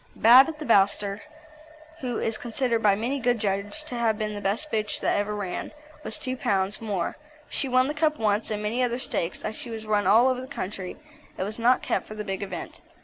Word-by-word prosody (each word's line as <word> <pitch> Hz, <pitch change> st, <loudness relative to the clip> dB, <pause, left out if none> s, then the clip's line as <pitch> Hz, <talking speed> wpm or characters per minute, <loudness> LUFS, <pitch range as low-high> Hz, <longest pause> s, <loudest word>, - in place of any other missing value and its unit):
Bab 250 Hz, +6 st, +8 dB
at 315 Hz, -, -6 dB
the 305 Hz, -, -6 dB
Bowster, 200 Hz, -2 st, +3 dB, 0.8 s
who 250 Hz, -5 st, -3 dB
is 225 Hz, -, -1 dB
considered 235 Hz, 0 st, -1 dB
by 205 Hz, -2 st, +5 dB
many 245 Hz, +7 st, -2 dB
good 245 Hz, -1 st, +2 dB
judges 205 Hz, +7 st, -2 dB
to 305 Hz, -, -7 dB
have 230 Hz, -3 st, +1 dB
been 215 Hz, -1 st, -2 dB
the 205 Hz, -, -5 dB
best 210 Hz, +10 st, -1 dB
bitch 215 Hz, -1 st, -1 dB
that -, -, +1 dB
ever 205 Hz, +1 st, -1 dB
ran, 195 Hz, -3 st, -4 dB, 0.3 s
was -, -, -2 dB
2 260 Hz, -4 st, -3 dB
lbs. 195 Hz, -2 st, 0 dB
more; 200 Hz, -6 st, -2 dB, 0.3 s
she 270 Hz, -, -2 dB
won 255 Hz, +1 st, +4 dB
the 295 Hz, -, -2 dB
Cup 305 Hz, 0 st, +1 dB
once, 215 Hz, 0 st, +1 dB
and 210 Hz, -1 st, -3 dB
many 225 Hz, +4 st, 0 dB
other 245 Hz, -1 st, +1 dB
stakes, 185 Hz, -9 st, -3 dB
as 215 Hz, -, -3 dB
she 240 Hz, -, -7 dB
was 220 Hz, -1 st, -6 dB
run 210 Hz, -1 st, +1 dB
all 235 Hz, +4 st, +6 dB
over 255 Hz, -1 st, 0 dB
the 260 Hz, -, -8 dB
country 190 Hz, -8 st, -5 dB, 0.4 s
and 185 Hz, -, -1 dB
was 215 Hz, +3 st, -5 dB
not 245 Hz, +2 st, +3 dB
kept -, -, -1 dB
for 215 Hz, -, -8 dB
the 210 Hz, -, -4 dB
big 195 Hz, 0 st, -3 dB
event. 190 Hz, -4 st, -6 dB
220 Hz, 225 wpm, -26 LUFS, 205-250 Hz, 0.8 s, Bab